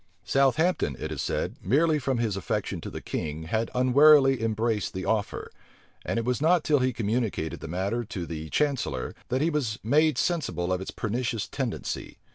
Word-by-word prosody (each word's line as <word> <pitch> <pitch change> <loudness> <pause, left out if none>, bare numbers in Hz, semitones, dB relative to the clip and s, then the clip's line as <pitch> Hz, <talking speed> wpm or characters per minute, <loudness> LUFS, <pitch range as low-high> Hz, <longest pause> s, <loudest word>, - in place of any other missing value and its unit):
* - - -41 0.2
Journals, 135 -1 +3
vol. 160 - +2
viii. 180 +1 +3
p. - - -22
24 70 - -1
Southampton, - - -5
it - - -4
is - - -3
said, - - -2
merely 150 - +3
from 130 -2 -1
his 115 -4 0
affection 95 - -2
to - - -6
the - - -7
king, 80 +1 -4
had 110 +8 -1
unwarily 135 0 +6
embraced 110 -2 -1
the 95 - -3
offer; 110 -2 -1 0.5
and - - -2
it 115 - -1
was 125 +2 0
not 165 +1 +4
till 150 -2 +3
he 130 0 +2
communicated 110 -7 -2
the - - -7
matter 95 +8 -1
to 100 -6 -5
the 80 -1 -6
chancellor, 145 - -1 0.2
that 130 +4 +1
he 165 - +2
was 125 -9 -1
made 150 +4 +3
sensible 95 - 0
of 90 - -2
its 95 - -6
pernicious 115 0 -2
tendency. 130 -6 -4
120 Hz, 210 wpm, -27 LUFS, 100-140 Hz, 0.5 s, unwarily